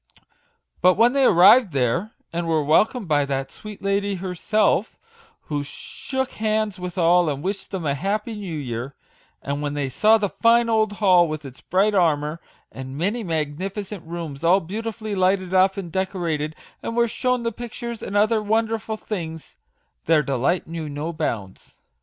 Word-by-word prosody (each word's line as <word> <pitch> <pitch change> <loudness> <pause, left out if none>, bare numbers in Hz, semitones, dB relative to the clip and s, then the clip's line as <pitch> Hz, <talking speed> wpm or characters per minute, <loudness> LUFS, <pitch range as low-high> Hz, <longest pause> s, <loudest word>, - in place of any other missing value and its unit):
But 180 0 +5
when 235 +4 +4
they 275 -1 +3
arrived 190 - +6
there, 140 - 0 0.2
and 170 0 -2
were 160 -2 +2
welcomed 210 - +2
by 145 -2 +3
that 135 -1 -3
sweet 210 -2 -10
lady 200 0 0
herself, 190 +4 0 0.4
who 145 -1 -3
shook 265 - -5
hands 215 -2 -1
with 180 0 -6
all, 175 -1 +4
and 140 0 -4
wished 195 +1 -3
them 185 -5 -4
a 140 - +1
happy 210 - -2
new 195 -7 -5
year; 125 -1 -5 0.5
and 140 +1 -3
when 145 0 -3
they 140 -2 -1
saw 215 - +4
the 210 -2 0
fine 230 +2 +3
old 220 -2 +2
hall 185 -4 +4
with 155 -1 -5
its 130 -1 -11
bright 200 +4 +2
armour, 160 -4 +1 0.3
and 130 +1 -8
many 205 +8 -1
magnificent 185 +5 -3
rooms 165 -3 -6
all 180 +3 +5
beautifully 215 +4 -5
lighted 185 -1 +1
up 190 +1 +4
and 180 -4 -5
decorated, 165 -5 -2 0.3
and 230 - -4
were 235 0 +4
shown 250 +1 -1
the 230 - -1
pictures 235 0 -7
and 200 - -2
other 215 +1 +3
won 220 +2 +2
derful 220 0 -4
things, 165 -8 -6 0.5
their 155 -2 +4
delight 140 +6 0
knew 160 -2 -5
no 150 +4 -4
bounds. 110 - -5
185 Hz, 170 wpm, -23 LUFS, 155-215 Hz, 0.5 s, arrived